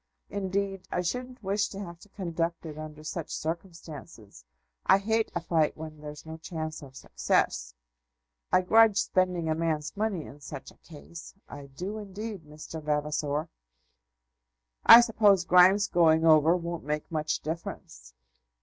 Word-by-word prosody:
Indeed, 195 -1 -2
I - - 0
shouldn't 250 +6 -4
wish 200 +2 0
to 195 - -9
have 170 -4 -8
to 205 - -17
conduct 170 -3 -3
it 155 -2 -7
under 155 0 -9
such 155 +1 -5
circumstances. 160 - -7 0.4
I - - +5
hate 220 +3 0
a 170 - -1
fight 160 -2 +1
when 155 -1 -9
there's 150 0 -9
no 160 0 -8
chance 160 -1 -6
of 135 -2 -13
success. - - -1 0.8
I - - +5
grudge 220 +1 +5
spending 180 -4 +1
a 160 - +2
man's 155 -2 -2
money 205 -6 -2
in 145 - -12
such 140 -1 -9
a - - -23
case; 165 +2 -12
I 140 -1 -10
do 185 +10 -6
indeed, 205 -2 -7
Mr. 155 +1 -9
Vavasor." 150 0 -1 1.4
"I 235 - +12
suppose 210 -5 +3
Grimes's 185 +3 +6
going 165 -2 +4
over 160 +1 +6
won't 170 -1 -5
make 150 +2 -4
much 155 -1 -1
difference?" - - -7
165 Hz, 150 wpm, -28 LUFS, 150-195 Hz, 1.4 s, I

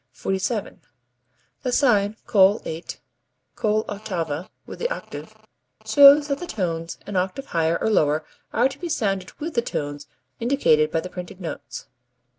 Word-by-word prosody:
47. 195 - -2 0.8
The 255 - -2
sign 215 -6 +3
Col 200 +1 +5
8 160 +2 -6 0.6
(coll'ottava 195 -7 -2 0.2
with - - -9
the 485 - 0
octave) - - -7 0.5
shows 285 +1 +8
that 280 -1 -1
the 355 - -6
tones 165 - -3
an 205 - -6
octave 190 +9 -1
higher 165 0 +2
or 220 - 0
lower 155 -5 +2 0.3
are 240 +3 +3
to 270 +1 -10
be 345 - -4
sounded 195 - -1
with 320 +2 -6
the 235 - +2
tones 145 -8 -4 0.3
indicated 230 - +3
by 160 - 0
the 180 - -7
printed 180 +1 -8
notes. 170 -4 -7
200 Hz, 145 wpm, -23 LUFS, 165-250 Hz, 0.8 s, shows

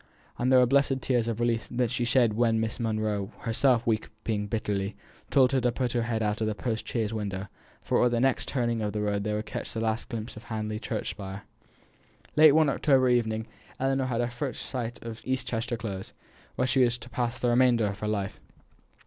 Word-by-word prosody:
And 125 +2 +2
they 130 - +7
were 125 - +7
blessed 135 +1 +3
tears 120 -3 +1
of 115 -1 -2
relief 120 -1 0
that 120 -1 0
she 120 -1 0
shed 120 -2 +3
when 115 0 +2
Miss 110 -1 -2
Monro, 110 -3 -1
herself 120 +1 +2
weeping 110 -1 -2
bitterly, 105 -2 -2 0.3
told 130 -2 +5
her 135 -1 +2
to 120 0 +2
put 125 0 -1
her 120 - 0
head 115 -1 -1
out 105 +1 -1
of 110 - +1
the 110 - -1
post 115 0 -3
chaise 115 -2 -1
window, 100 -3 -3 0.4
for - - +2
at 125 - +5
the 120 -1 0
next 135 +1 +1
turning 120 -4 0
of 105 -1 -2
the 105 - -1
road 100 -1 0
they 105 - -1
would 105 +1 -3
catch - - -5
the 115 - -3
last 110 0 -1
glimpse 115 0 -5
of 110 +1 -11
Hamley 110 -1 -3
church 110 -2 -3
spire. 100 -1 -7 0.9
Late 155 -1 +8
one 155 0 +5
October 135 -2 +3
evening, 110 -2 +1 0.3
Ellinor 135 0 +1
had 120 -2 0
her 120 0 -1
first 125 0 -4
sight 120 -2 -4
of 115 -1 -6
East 130 0 -1
Chester 120 +1 -2
Close, 100 -4 -5 0.4
where - - +1
she 130 0 +3
was 120 0 +2
to 120 - -10
pass 120 0 -2
the 125 - 0
remainder 120 -2 +4
of 100 0 -3
her 105 - -3
life. 100 -2 -2
115 Hz, 215 wpm, -28 LUFS, 110-125 Hz, 0.9 s, Late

